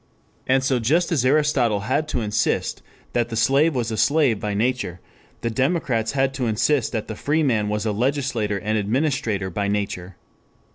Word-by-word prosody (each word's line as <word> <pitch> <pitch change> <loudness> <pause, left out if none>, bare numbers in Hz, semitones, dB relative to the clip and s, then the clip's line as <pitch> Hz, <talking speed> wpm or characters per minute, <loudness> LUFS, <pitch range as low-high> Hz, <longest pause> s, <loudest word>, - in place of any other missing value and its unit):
And 130 0 +3
so 130 -1 +1
just 160 +11 +1
as 145 -7 +2
Aristotle 130 -6 +2
had 135 +8 0
to 125 - -2
insist 105 0 -1 0.3
that 120 -1 0
the 115 - -4
slave 135 +7 +3
was 120 -2 -1
a 110 - -3
slave 140 -7 +3
by 105 -1 -3
nature, 115 -5 -1 0.4
the 115 - -1
democrats 130 -3 0
had 135 -1 +1
to 130 -3 -2
insist 120 +4 +1
that 110 -2 -3
the 110 - -5
free 155 +7 0
man 110 -7 +1
was 105 +1 -2
a 110 - +1
legislator 120 -3 -1
and 105 +2 -1
administrator 110 -4 -1
by 100 +3 -1
nature. 100 -3 -3
120 Hz, 180 wpm, -22 LUFS, 105-135 Hz, 0.4 s, And